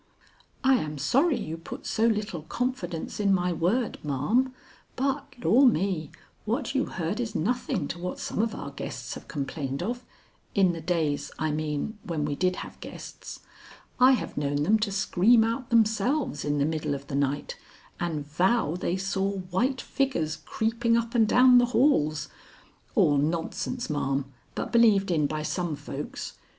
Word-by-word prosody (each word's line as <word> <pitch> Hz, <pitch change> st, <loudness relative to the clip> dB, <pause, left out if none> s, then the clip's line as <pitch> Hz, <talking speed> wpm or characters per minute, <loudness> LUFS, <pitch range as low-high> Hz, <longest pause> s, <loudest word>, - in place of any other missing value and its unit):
"I 265 Hz, -1 st, +5 dB
am 150 Hz, -5 st, -4 dB
sorry 270 Hz, -, +2 dB
you 160 Hz, +1 st, -5 dB
put 245 Hz, -, -9 dB
so 225 Hz, +1 st, +2 dB
little 210 Hz, -6 st, -1 dB
confidence 245 Hz, -1 st, -3 dB
in 200 Hz, -1 st, +3 dB
my 180 Hz, -2 st, +2 dB
word, 200 Hz, +9 st, 0 dB
ma'am, 150 Hz, -, +1 dB, 0.4 s
but 275 Hz, +1 st, -2 dB
Lor' 260 Hz, +5 st, +6 dB
me, 180 Hz, -7 st, +1 dB, 0.3 s
what 245 Hz, +6 st, -1 dB
you 270 Hz, -1 st, +1 dB
heard 175 Hz, +5 st, -3 dB
is 225 Hz, -3 st, -3 dB
nothing 195 Hz, -, -1 dB
to 170 Hz, -, -5 dB
what 180 Hz, +1 st, -4 dB
some -, -, -4 dB
of 225 Hz, -1 st, -1 dB
our 140 Hz, -, -6 dB
guests 140 Hz, -, -6 dB
have -, -, -10 dB
complained 140 Hz, 0 st, -3 dB
of 245 Hz, +5 st, -3 dB, 0.5 s
in 190 Hz, -3 st, +5 dB
the 165 Hz, -, -6 dB
days, 160 Hz, -4 st, -1 dB
I 155 Hz, 0 st, 0 dB
mean, 155 Hz, +7 st, -3 dB
when 160 Hz, -4 st, -2 dB
we 145 Hz, -, -1 dB
did 180 Hz, +5 st, +1 dB
have -, -, -13 dB
guests. -, -, -9 dB, 0.6 s
I 255 Hz, +1 st, +7 dB
have 255 Hz, -, -2 dB
known 145 Hz, 0 st, 0 dB
them 215 Hz, +7 st, +4 dB
to 215 Hz, -1 st, 0 dB
scream 200 Hz, +4 st, +4 dB
out 230 Hz, +3 st, -2 dB
themselves 225 Hz, -, +2 dB
in 145 Hz, 0 st, 0 dB
the 140 Hz, -, +2 dB
middle 155 Hz, -2 st, -1 dB
of 140 Hz, 0 st, -8 dB
the 140 Hz, -, -9 dB
night 140 Hz, +1 st, -1 dB, 0.4 s
and 160 Hz, -4 st, -2 dB
vow 175 Hz, +2 st, +1 dB
they 180 Hz, 0 st, -1 dB
saw 195 Hz, +1 st, -1 dB, 0.2 s
white 255 Hz, +8 st, +1 dB
figures 165 Hz, -, -1 dB
creeping 230 Hz, +1 st, +1 dB
up 235 Hz, 0 st, -2 dB
and 225 Hz, -3 st, +4 dB
down 250 Hz, +2 st, +7 dB
the 245 Hz, -, +4 dB
halls 155 Hz, -, +3 dB, 0.7 s
all 165 Hz, -, +4 dB
nonsense, 165 Hz, -, -2 dB
ma'am, 140 Hz, -2 st, -1 dB, 0.3 s
but -, -, -3 dB
believed 215 Hz, -5 st, +5 dB
in 150 Hz, -4 st, +2 dB
by 155 Hz, +1 st, -3 dB
some 160 Hz, +1 st, -2 dB
folks. -, -, -7 dB
190 Hz, 165 wpm, -27 LUFS, 155-235 Hz, 0.7 s, I